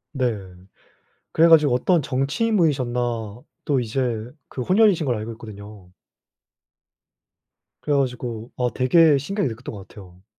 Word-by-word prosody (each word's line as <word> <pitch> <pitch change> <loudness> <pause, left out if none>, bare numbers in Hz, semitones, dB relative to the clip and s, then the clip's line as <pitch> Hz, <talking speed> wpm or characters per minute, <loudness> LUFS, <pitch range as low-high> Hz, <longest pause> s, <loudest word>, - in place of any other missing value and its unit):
네. 125 -5 0 0.9
그래 165 +1 +4
가지고 150 -6 +5
어떤 170 +6 +2
정치인 150 - -1
분이셨나 130 -8 +1 0.7
또 140 -3 +1
이제 120 -1 -2 0.2
그 130 - -6
혼혈이신 190 - +3
걸로 125 -4 0
알고 110 +2 -6
있거든요. 105 -4 -12 1.9
그래 145 - 0
가지고 125 -3 -3
아 125 -1 0
되게 150 +3 +4
신기하게 145 - -2
느꼈던 115 +3 -8
것 100 -1 -11
같아요. 95 -4 -15
130 Hz, 290 characters per minute, -22 LUFS, 115-150 Hz, 1.9 s, 가지고